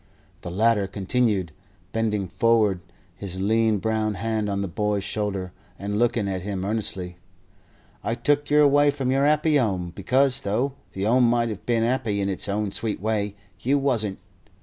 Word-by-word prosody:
The - - -6
latter 105 +2 +2
continued, 100 -2 0 0.4
bending 105 -3 -1
forward, 110 -2 +2 0.4
his 95 -2 -5
lean 110 +2 +2
brown 110 0 -1
hand 110 +1 -2
on 100 0 -1
the 100 - -2
boy's 105 +2 -1
shoulder, 100 -3 -2 0.3
and 105 +1 -3
looking 115 -3 +1
at 95 -1 -3
him 95 -1 -4
earnestly: 95 -4 0 0.9
"I 115 - -1
took 145 +3 +1
yer 150 0 +5
away 145 0 +5
from 130 -2 -1
your 135 +2 +3
'appy 150 0 +3
'ome 95 -8 -1
because, 130 +8 +2
though 120 +7 -1 0.2
the 95 +1 -3
'ome 120 +2 +4
might 120 -1 +1
have 105 -1 -7
been 115 -2 +2
'appy 115 -4 0
in 100 0 0
its 95 +1 0
own 105 0 -1
sweet 110 0 0
way, 105 0 -1 0.2
you 135 +7 +1
wasn't. 115 -8 +1
110 Hz, 170 wpm, -24 LUFS, 100-120 Hz, 0.9 s, yer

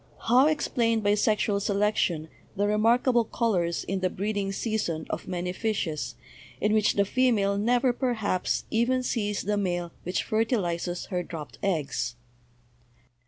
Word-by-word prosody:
How 255 +5 +5
explain 230 -7 +1
by 205 0 +3
sexual 210 -1 +2
selection 200 -6 0 0.3
the 205 +1 +1
remark 225 +5 +3
able 240 -2 +4
colors 190 -7 0
in 195 0 -2
the 185 0 +1
breeding 200 +1 -2
season 195 -7 -2
of 155 - -4
many 180 -1 -3
fishes, 185 - -2 0.4
in 210 +1 +2
which 215 -1 +3
the 200 - +3
female 215 -4 +2
never, 245 +4 +2
perhaps, 220 -8 -1
even 250 +3 +2
sees 210 -4 -1
the 205 +2 0
male 175 -3 -1
which 180 +2 -2
fer 220 +1 +1
tilizes 175 -6 -2
her 180 -3 -1
dropped 160 -4 -8
eggs? 155 -10 -1
205 Hz, 145 wpm, -27 LUFS, 180-225 Hz, 0.4 s, How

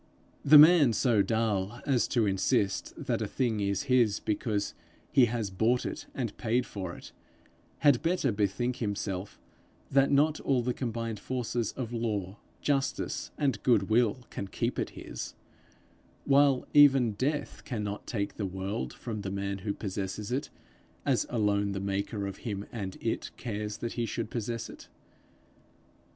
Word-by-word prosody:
The 150 +2 +9
man 150 -5 +8
so 110 -1 +3
dull 105 0 0
as 130 -4 +2
to 115 -3 +2
insist 95 0 0
that - - 0
a - - -1
thing 120 -5 0
is 100 +6 0
his 125 -6 +3
because 105 -1 -1 0.4
he 135 -3 +6
has 115 -4 -2
bought 115 +6 +1
it - - -5
and 120 -6 -3
paid 120 +2 +1
for 95 -4 -6
it, - - -12 0.7
had 140 -4 +6
better 165 -5 +1
bethink 110 +5 0
himself 100 -4 -3 0.5
that 135 0 +4
not 150 +2 +3
all 130 -3 +1
the 125 +1 0
combined 115 -3 -3
forces 120 -3 -2
of 120 -3 -5
law, 105 -4 -2 0.2
justice, 140 -2 -1
and 135 -7 0
goodwill, 115 +1 +2
can 100 - -4
keep - - -2
it - - -1
his; - - -7 0.9
while 140 -2 +4
even 135 -5 +6
death 140 +8 -2
cannot 105 -4 -4
take 100 -4 -3
the 105 - -2
world 95 -8 -4
from 110 -3 -5
the 100 - -4
man 100 0 -3
who 100 +2 -2
possesses 100 +2 -4
it 130 +3 -1 0.6
as - - +2
alone 100 -3 +1
the 95 - -3
maker 100 +1 -2
of 100 -1 -5
him 100 -4 -4
and 100 -5 -5
it - - -2
cares 105 -2 -4
that 115 - -4
he 120 -1 -2
should 115 0 -4
possess 115 0 -3
it. - - -12
110 Hz, 155 wpm, -29 LUFS, 100-125 Hz, 0.9 s, The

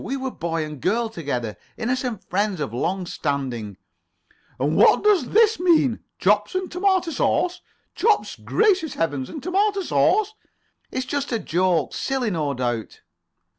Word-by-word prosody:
We 275 - -3
were 265 -1 -3
boy 165 -4 -2
and 150 -4 -9
girl 225 +4 +1
together. 125 - -4 0.2
Innocent 245 -2 -2
friends 205 -3 0
of 140 -7 -3
long 180 +9 -1
standing." 125 - -3 0.8
"And 145 +5 +1
what - - +5
does 400 - +3
this 445 -1 +4
mean? 315 -9 +3 0.2
Chops 210 - +2
and 370 -1 -2
tomato 365 -1 +1
sauce? 360 +3 0 0.3
Chops! 430 0 +1
Gracious 380 -9 +1
Heavens! 145 -5 -2
And 300 - -8
tomato 395 +3 +1
sauce." 430 +3 +2 0.6
"It's 255 - -3
just 280 +2 -3
a 230 - +1
joke. 175 - 0
Silly, 265 -5 -1
no 150 -5 -1
doubt." 120 -3 -3
225 Hz, 145 wpm, -23 LUFS, -, 0.8 s, what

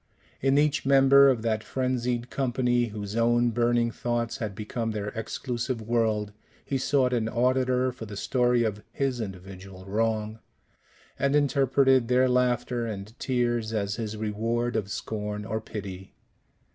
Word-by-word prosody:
In 135 +1 +3
each 150 +1 +2
member 140 0 +6
of 120 -4 0
that 110 -1 0
frenzied 125 -2 -2
company, 125 -2 +1
whose 105 -2 -6
own 120 +1 +3
burning 120 0 +1
thoughts 120 0 -2
had 105 -4 -4
become 115 +2 -3
their 105 -2 -3
exclusive 120 +2 -3
world, 110 -2 0 0.3
he 135 - -1
sought 130 -1 +2
an 115 -2 0
auditor 130 +1 +1
for 120 -3 -9
the 100 -1 -8
story 125 +1 +2
of 105 -2 -2
his 135 -3 -1
individual 95 -1 -9
wrong, 110 +1 -1 0.8
and 140 +1 +2
interpreted 135 -3 +3
their 125 +1 +4
laughter 125 -1 +1
and 105 0 -6
tears 120 -3 0
as 100 -1 -1
his 110 -2 -4
reward 115 +3 -1
of 105 -3 -1
scorn 105 0 -4
or 110 +2 -3
pity. 95 -3 -8
120 Hz, 145 wpm, -27 LUFS, 110-125 Hz, 0.8 s, member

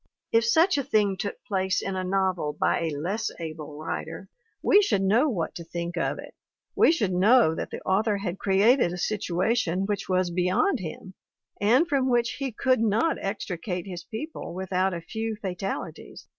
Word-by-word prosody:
If 230 0 +4
such 320 +7 +4
a - - -1
thing 210 -6 +2
took 200 +2 -4
place 190 -2 0
in 195 - -3
a 185 - -2
novel 185 -5 0
by - - +2
a 160 -3 -2
less 195 +10 -2
able 155 -2 -7
writer 155 - -5 0.3
we 410 - +6
should 385 - +1
know 230 +10 +3
what 175 -10 -2
to 170 - -7
think 170 +1 -5
of 170 - -1
it; - - -10 0.4
we - - +6
should 210 - 0
know 200 0 +5
that - - -4
the - - -7
author 205 +2 +1
had 195 -2 -4
created 200 +2 +3
a 180 - -5
situation 190 0 0
which 200 -1 -3
was 185 -1 +1
beyond 185 - +1
him 185 +2 -7 0.5
and 250 +11 +4
from 270 -5 +1
which 240 -1 +1
he 275 -2 -2
could 255 +3 +1
not 225 +8 +1
extricate 185 -2 -3
his 180 -3 -7
people 235 - -7
without 190 0 0
a 170 -2 -4
few 220 +6 -4
fatalities! 195 -2 -5
195 Hz, 180 wpm, -26 LUFS, 180-230 Hz, 0.5 s, we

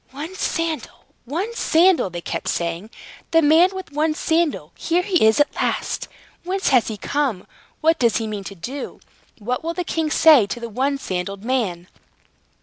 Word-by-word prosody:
"One 300 +7 -7
sandal! 330 -4 -3 0.2
One 355 - -3
sandal!" 350 - +3
they 175 -1 -6
kept - - -4
saying. 170 +4 -2 0.4
"The 330 0 +4
man 320 +5 +6
with 375 -5 -8
one 305 +2 0
sandal! 325 -1 0
Here 345 +2 0
he 365 - +2
is 220 +3 +4
at 290 - +3
last! - - -2 0.4
Whence 380 +2 -1
has 255 -4 +4
he 220 - -4
come? 255 -3 -2 0.4
What 320 0 +3
does 235 -2 +3
he 225 - -2
mean 210 -2 -5
to 200 - -7
do? 255 +11 -7 0.4
What 245 +6 -3
will 335 +1 -3
the 360 - -2
king 320 -2 -1
say 300 -8 +6
to 240 - -5
the 235 -1 -6
one 270 +5 0
sandaled 195 -3 -4
man?" 215 -9 -1
285 Hz, 175 wpm, -21 LUFS, 215-330 Hz, 0.4 s, man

